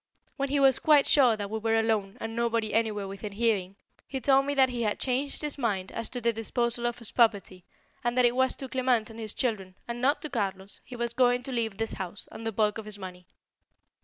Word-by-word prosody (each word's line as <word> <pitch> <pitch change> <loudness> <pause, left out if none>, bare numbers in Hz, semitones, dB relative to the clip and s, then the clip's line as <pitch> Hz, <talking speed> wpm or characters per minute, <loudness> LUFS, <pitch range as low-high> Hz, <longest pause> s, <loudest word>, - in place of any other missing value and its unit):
When 275 -1 -2
he 285 +1 +1
was 270 -2 +5
quite 295 -3 +5
sure 250 -6 +5
that 205 -1 -5
we 220 - -2
were 225 0 +1
alone 220 -2 0
and 225 0 -5
nobody 230 -2 0
anywhere 215 -3 0
within 200 +1 -7
hearing, 200 -4 0 0.3
he 265 - -4
told 270 +2 +3
me 285 - -1
that 265 -1 +5
he 245 -1 -3
had 210 -2 0
changed 270 +3 0
his 295 -1 -2
mind 200 -7 -1
as 230 - -4
to 250 - -4
the 235 -1 +1
disposal 235 +2 0
of 240 - -3
his 230 -3 -6
property 200 -6 +1 0.4
and 240 +1 -1
that 250 - +5
it 240 0 +3
was 260 0 +2
to 270 - -6
Clement 250 -4 0
and 225 - -11
his 215 -2 -5
children, 195 -7 -2
and 235 0 -5
not 280 +3 +2
to 305 - -4
Carlos, 195 -5 -3
he 250 - -10
was 235 -1 -3
going 245 0 +3
to 270 - -6
leave 225 -5 -1
this 225 0 -2
house 190 +1 -4
and 225 - -7
the - - -1
bulk 210 0 +1
of 220 - -8
his 210 -1 -6
money. 180 -2 -9
230 Hz, 240 wpm, -28 LUFS, 210-250 Hz, 0.4 s, was